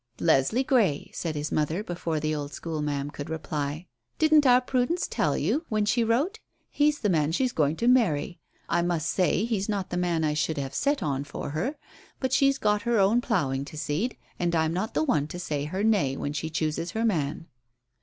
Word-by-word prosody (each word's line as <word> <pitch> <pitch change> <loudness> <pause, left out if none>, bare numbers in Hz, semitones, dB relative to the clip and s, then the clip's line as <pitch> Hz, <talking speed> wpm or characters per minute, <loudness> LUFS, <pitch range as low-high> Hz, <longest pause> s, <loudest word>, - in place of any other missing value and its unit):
"Leslie 165 - +3
Grey," 215 - +1
said 165 -3 -3
his 150 +1 -3
mother, 155 +6 0
before 170 -4 -3
the 155 +1 -1
old 145 -1 -4
school 160 -2 -4
ma'am 145 -1 -2
could 145 0 -7
reply. 155 0 -3 0.3
"Didn't 310 -2 +5
our 250 0 +7
Prudence 255 +7 0
tell - - 0
you 310 - 0
when 215 -1 +1
she 230 +3 +2
wrote? 280 - 0 0.3
He's 295 0 +2
the 210 - +1
man 155 -4 +2
she's 255 +9 +1
going 150 -4 +1
to 235 - -1
marry. 190 - +2 0.3
I 170 - +1
must 170 -2 0
say 185 +4 +1
he's 215 -3 -1
not 200 -3 -2
the 175 - -1
man 175 -2 0
I 150 -1 +1
should 150 +1 -1
have 135 -1 -3
set 285 - 0
on 140 -2 -1
for 145 0 -6
her; 235 - -2 0.4
but 260 -1 -1
she's 275 0 +4
got 210 -3 +1
her 235 -1 +1
own 205 +5 +4
ploughing 140 - 0
to 155 - -10
seed, 155 +12 -2 0.2
and 175 -1 0
I'm 160 0 +1
not 190 +5 -3
the - - +2
one 150 - +1
to 175 - -7
say 150 -5 -3
her 185 +6 -3
'nay' 185 -12 +2
when 145 - -3
she 155 +2 -3
chooses 160 +2 -2
her 225 +1 0
man." 160 -7 -1
175 Hz, 210 wpm, -27 LUFS, 150-230 Hz, 0.4 s, our